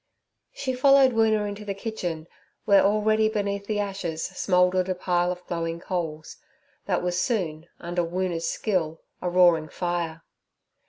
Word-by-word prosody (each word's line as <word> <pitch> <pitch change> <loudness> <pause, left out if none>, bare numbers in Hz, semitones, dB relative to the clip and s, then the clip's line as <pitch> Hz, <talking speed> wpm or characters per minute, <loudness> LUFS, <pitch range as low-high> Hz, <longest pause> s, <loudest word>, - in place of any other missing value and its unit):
She 260 -2 -3
followed 270 +1 +5
Woona 220 -2 +2
into 205 +1 -6
the 200 -1 -4
kitchen, 180 -7 -4 0.4
where 200 -2 +6
already 215 +1 +3
beneath 200 -2 -2
the 210 -1 -1
ashes 195 -5 -3
smouldered 180 0 +1
a 185 - 0
pile 180 0 0
of 180 0 -7
glowing 165 -1 -3
coals, 160 -4 -4 0.5
that - - 0
was 180 0 0
soon, 170 -9 -2
under 175 0 -2
Woona's 175 -1 -2
skill, 165 -7 -2 0.2
a 180 - -1
roaring 175 -3 +4
fire. 170 -2 -3
180 Hz, 145 wpm, -25 LUFS, 170-210 Hz, 0.5 s, where